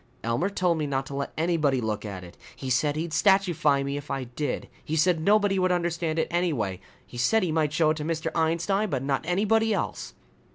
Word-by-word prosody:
"Elmer 115 - 0
told 180 -4 0
me 150 - -1
not 135 -1 -1
to 140 - -8
let 140 0 -3
anybody 155 -5 +1
look 110 -3 -2
at 95 -3 -6
it. 85 -1 -12 0.2
He 130 -1 -5
said 145 +4 +2
he'd 160 +2 -3
statuefy 165 -6 +3
me 140 +1 -2
if 145 0 -8
I 135 -1 -2
did. 125 +3 -4 0.2
He 155 - -3
said 165 +1 +2
nobody 200 +1 +3
would 185 0 +2
understand 170 -2 -1
it 160 - +1
anyway. 130 - -1 0.2
He 120 - -9
said 220 - +3
he 175 - 0
might 155 -2 +1
show 155 0 +3
it 155 - -2
to 150 - -4
Mr. 160 0 -3
Einstein, 170 +6 +1
but 135 -4 -2
not 135 -1 0
anybody 215 +4 +2
else." - - -4
160 Hz, 215 wpm, -26 LUFS, 140-180 Hz, 0.2 s, statuefy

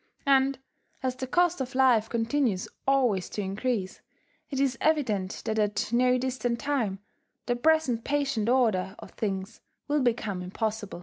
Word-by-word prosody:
And 275 0 +4 0.5
as 255 -1 0
the 260 0 -5
cost 350 +2 +2
of 255 0 -5
life 245 -5 +4
continues 230 -4 0 0.2
always 245 -9 +2
to 210 - -3
increase, 195 0 -2 0.5
it 270 - -3
is 270 -2 +2
evident 220 -12 0
that 220 0 0
at 210 +2 0
no 250 +1 +4
distant 245 -2 -2
time, 245 -9 -1 0.5
the 245 - 0
present 260 -3 +2
patient 275 -6 0
order 210 -7 +2
of - - -11
things 195 0 -4 0.3
will 295 0 +1
become 220 -6 0
impossible. 210 +1 -3
245 Hz, 145 wpm, -28 LUFS, 210-270 Hz, 0.5 s, And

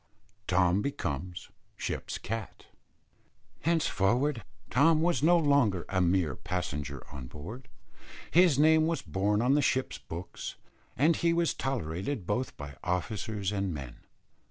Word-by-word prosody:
TOM 90 +1 +3
BECOMES 90 - -4 0.3
SHIP'S - - -3
CAT. 115 -2 -6 0.9
Henceforward 135 - +1 0.3
Tom 155 +6 +5
was 175 -3 +2
no 170 +3 +5
longer 140 - +3
a 95 -1 +1
mere 90 -4 +2
passenger 70 -6 -4
on 65 -3 -7
board; 110 - -9 0.6
his 175 -5 +5
name 155 +1 +5
was 165 -4 -1
borne 100 +6 +1
on 130 +2 +4
the 145 - +4
ship's 130 -1 0
books, 85 +3 -7 0.4
and 155 +6 +4
he 170 0 +2
was 170 -1 +2
tolerated 100 - -3
both 120 +7 -2
by 70 -1 -8
officers 95 +3 -2
and 95 -4 -1
men. 65 -4 -7
105 Hz, 130 wpm, -30 LUFS, 90-145 Hz, 0.9 s, Tom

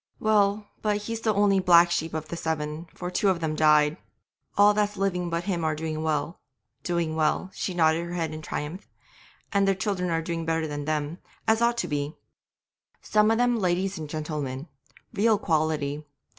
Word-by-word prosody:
Well, 210 -1 +2 0.2
but 210 -1 +1
he's 230 +1 -4
the 220 - +2
only 200 -1 +4
black 175 -1 +6
sheep 160 -1 -1
of 155 -1 -4
the - - -4
seven, 160 0 -3
for 180 0 -5
two 200 +1 +2
of 185 -3 +1
them 160 -2 -1
died. 150 -1 +4 0.6
All 205 +1 +7
that's 205 0 0
living 180 -3 -1
but 170 +1 -2
him 175 -4 -2
are 155 -1 +1
doing 155 0 -3
well, 155 +1 -1 0.4
doing 170 -3 -1
well' 160 +4 0
(she 185 - -3
nodded 165 0 +2
her 175 - -5
head 165 -3 -2
in 155 - -6
triumph), 155 +5 -5 0.6
'and 200 -1 +3
their 195 - +3
children 180 -4 -1
doing 165 0 -3
better 165 0 0
than 145 -1 -4
them, 155 +2 -2 0.3
as 220 +1 +3
ought 235 0 +3
to - - -1
be. 145 +1 -2 0.9
Some 210 0 +3
of 225 - +3
them 245 -1 +2
ladies 185 0 0
and 155 -2 -6
gentlemen, 150 -2 -4 0.5
real 215 +1 +3
quality. 155 -5 0
170 Hz, 185 wpm, -26 LUFS, 155-200 Hz, 0.9 s, All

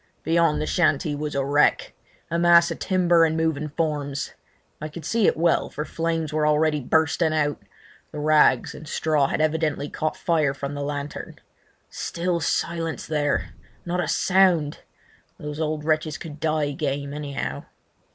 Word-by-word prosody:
Beyond, 165 -1 +2
the - - -1
shanty 155 -3 +1
was 150 0 -4
a 135 -1 0
wreck—a 150 +3 0
mass 170 0 +5
of - - -5
timber 175 -3 +3
and 160 0 +2
moving 155 -2 -1
forms. 145 -3 -2 0.5
I 155 - -4
could 155 0 -9
see 225 +3 +2
it - - +2
well, 170 +1 +2
for 150 - -5
flames 165 -2 -2
were 155 0 +1
already 150 0 +2
bursting 160 +3 +1
out; 145 -1 0 0.5
the - - -8
rags 150 0 +3
and 155 - -11
straw 150 -2 +1
had 155 - -1
evidently 155 -2 0
caught 155 0 -2
fire 155 -6 +1
from 140 0 -5
the 145 - -5
lantern. 145 0 -5 0.6
Still 170 0 -2
silence 165 +1 -2
there! 150 -2 -1 0.3
Not 175 0 -1
a - - -3
sound! 180 -6 +2 0.6
These 150 0 -6
old 155 -1 -2
wretches 155 0 0
could 155 -3 -9
die 155 -2 0
game, 140 0 -3
anyhow. 145 -2 -4
155 Hz, 155 wpm, -24 LUFS, 145-165 Hz, 0.6 s, mass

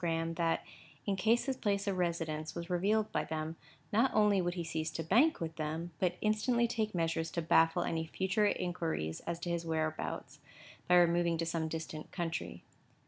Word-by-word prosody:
Graham 165 -1 0
that, 165 -1 0 0.4
in 200 - +1
case 220 +5 +2
his 270 -2 -1
place 200 -2 0
of 195 -3 -1
residence 160 -3 -2
was 170 +1 -5
revealed 205 +5 +2
by - - 0
them, 160 0 -4 0.4
not 235 +5 +4
only 210 -2 +4
would 175 0 -1
he 175 - -2
cease 160 -1 -2
to 165 - -3
bank 245 - +4
with 160 -1 -4
them, 160 +2 -3
but 180 -1 +1
instantly 235 +3 +2
take 215 -3 -2
measures 165 -1 0
to 170 - -2
baffle 165 +2 +4
any 160 0 -2
future 190 +5 +1
inquiries 165 - -2
as 170 0 -1
to 175 - -2
his 170 -1 -1
whereabouts, 160 -1 -3 0.5
by 180 - +5
removing 170 -1 +4
to 165 - -1
some 165 -1 -1
distant 160 -1 -6
country. 170 -3 -4
170 Hz, 185 wpm, -33 LUFS, 165-200 Hz, 0.5 s, by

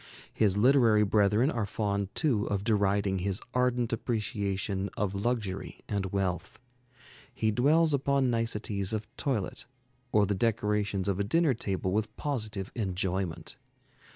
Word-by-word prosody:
His 105 -3 +2
literary 115 -2 +5
brethren 105 +6 +3
are 115 -7 -2
fond 100 -1 -1
too 125 -10 +1
of 100 -1 -1
deriding 100 -3 +1
his 95 +2 -1
ardent 125 -2 +1
appreciation 100 -4 -2
of 100 -2 -1
luxury 100 -2 -3
and 100 -2 -1
wealth. 95 -2 -2 0.7
He 110 - 0
dwells 150 +7 +3
upon 140 -2 +2
niceties 105 -3 -1
of 110 0 -3
toilet 120 -9 -2 0.4
or 105 -1 +4
the 100 - 0
decorations 105 -2 0
of 100 -1 0
a - - +2
dinner 155 +7 +2
table 95 -4 -2
with 110 +2 -2
positive 110 -9 -3
enjoyment. 95 -5 -3
105 Hz, 130 wpm, -29 LUFS, 100-115 Hz, 0.7 s, literary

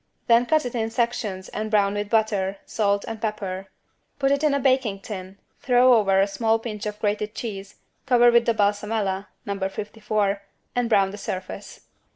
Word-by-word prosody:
Then 235 +1 +4
cut 310 +2 +2
it 245 - -4
in 225 -2 -1
sections 225 -5 -2
and 215 +1 -4
brown 200 -2 +3
with 205 0 -3
butter, 205 -3 +1
salt 200 -2 0
and 225 -1 -6
pepper. 195 -3 -3 0.5
Put 275 -1 +1
it 280 +2 +1
in 295 -2 +3
a - - +1
baking 255 -7 +1
tin, 190 -2 -7 0.2
throw 250 0 +5
over 195 -4 +4
a 195 - +5
small 220 +3 +1
pinch 215 -2 -5
of 210 0 -5
grated 210 0 -1
cheese, 200 -4 -6 0.3
cover 240 -2 +6
with 235 0 +4
the 230 - +3
=balsamella= 205 -1 0 0.2
(No. 200 -1 -3
54) 210 -1 -2 0.3
and 245 -1 0
brown 195 -3 +3
the 205 - -8
surface. 185 +2 -6
210 Hz, 180 wpm, -24 LUFS, 200-235 Hz, 0.5 s, cover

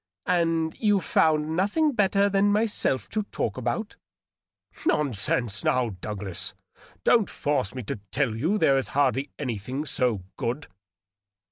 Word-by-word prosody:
"And 165 -2 +1
you 205 -3 +3
found 155 -2 +2
nothing 210 - +2
better 200 -4 +3
than 200 0 +3
myself 210 - +1
to 215 - -1
talk 105 - -2
about?" 130 - -3 0.4
" - - -21
Nonsense, 115 -6 +1
now, 125 -2 +2
Douglas! 95 -3 -4 0.5
Don't 225 -4 +4
force 130 -7 -1
me 130 - -4
to 115 +2 -4
tell 125 -5 0
you 160 - +1
there 135 -9 +4
is 135 - -3
hardly 135 -1 +2
anything 130 +2 -3
so 120 -9 0
good." 125 +7 -2
145 Hz, 135 wpm, -26 LUFS, 120-195 Hz, 0.5 s, Don't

